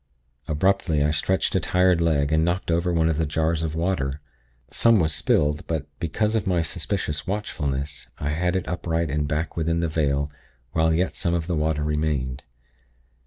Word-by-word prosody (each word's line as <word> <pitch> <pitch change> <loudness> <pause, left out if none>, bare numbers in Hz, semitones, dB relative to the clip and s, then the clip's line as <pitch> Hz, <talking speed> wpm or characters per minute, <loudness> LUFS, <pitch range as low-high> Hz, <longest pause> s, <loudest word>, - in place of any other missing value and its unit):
Abruptly, 80 -1 +2
I 75 - +2
stretched 85 +5 +1
a - - +3
tired 90 -2 +3
leg, 75 -3 +2
and 80 0 +3
knocked 85 +1 0
over 85 +2 +1
one 80 -1 +2
of 80 -1 0
the 80 - +2
jars 80 +2 0
of 80 -1 -2
water. 80 -5 -1 0.5
Some 115 -2 +4
was 80 -3 +2
spilled; 75 +1 +1
but, 80 -4 -2
because 105 +6 0
of 110 -5 0
my 90 -3 +2
suspicious 75 -1 -3
watchfulness, 75 -9 -3
I 75 - -2
had 90 +4 0
it 95 - -1
upright 85 -3 -1
and 75 0 0
back 75 +2 -2
within 85 0 0
the 85 - +1
vale 70 -2 0 0.4
while 80 +2 +2
yet 90 +3 +1
some 85 0 0
of 85 -2 -1
the 85 0 -1
water 75 -1 0
remained. 75 -4 -1
80 Hz, 180 wpm, -24 LUFS, 75-85 Hz, 0.5 s, Some